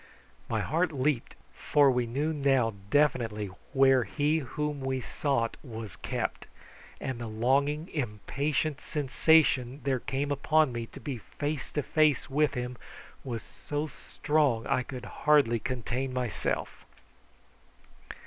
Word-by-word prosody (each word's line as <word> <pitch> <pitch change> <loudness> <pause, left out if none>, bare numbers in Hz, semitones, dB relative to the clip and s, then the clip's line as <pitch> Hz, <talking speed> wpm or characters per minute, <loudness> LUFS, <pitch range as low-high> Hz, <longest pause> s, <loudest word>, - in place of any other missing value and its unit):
My - - 0
heart 165 +3 +1
leaped, 140 -3 -1 0.2
for 145 -2 +4
we 125 -1 0
knew 145 +7 -1
now 135 -6 +2 0.2
definitely 115 -8 +1 0.2
where 135 -2 +5
he 150 +5 +1
whom 150 +2 -3
we 130 0 -1
sought 130 -3 -1
was 110 - -7
kept, - - -3 0.5
and 130 -3 -4
the 115 - -4
longing, 140 +8 +1
impatient 140 +4 -2
sensation 140 -2 +3
there 135 -2 +1
came 140 +4 -2
upon 155 +1 +3
me 120 -1 -4
to - - -12
be 135 -5 -5
face 145 +6 -4
to 150 - 0
face 150 -2 +2
with 150 +1 +2
him 125 0 -4 0.4
was 120 -4 -4
so 145 +1 -4
strong 145 -5 0
that - - 0
I - - +2
could 125 -1 -7
hardly 140 -6 +3
contain 130 +2 -3
myself. 125 -3 -2
135 Hz, 130 wpm, -29 LUFS, 120-150 Hz, 0.5 s, where